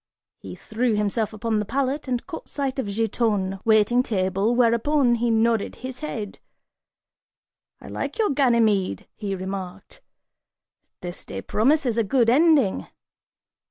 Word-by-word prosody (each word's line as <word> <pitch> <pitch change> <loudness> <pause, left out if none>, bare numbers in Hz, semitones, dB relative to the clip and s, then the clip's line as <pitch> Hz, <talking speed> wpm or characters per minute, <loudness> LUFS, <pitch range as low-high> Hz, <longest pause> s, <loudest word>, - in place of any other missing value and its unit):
He 90 -2 -9
threw 225 - -1
himself 210 +1 -1
upon 220 0 -1
the - - 0
pallet 275 +5 -2
and 245 -2 -2
caught 345 -3 -8
sight 275 -2 -3
of 260 - -2
Giton, 205 -2 -1
waiting 220 +2 +4
table, 195 0 0
whereupon, 245 +2 +3
he 235 0 0
nodded 225 -1 +1
his 255 0 -8
head, 220 -9 -6 1.4
"I - - -13
like - - -5
your 435 -6 +2
Ganymede," 225 - +2
he 200 -2 -4
remarked, 190 - -7 1.0
"this 175 0 -6
day 95 - -7
promises 245 0 +1
a - - +3
good 230 +2 +2
ending!" 290 - +3
230 Hz, 130 wpm, -24 LUFS, 200-255 Hz, 1.4 s, waiting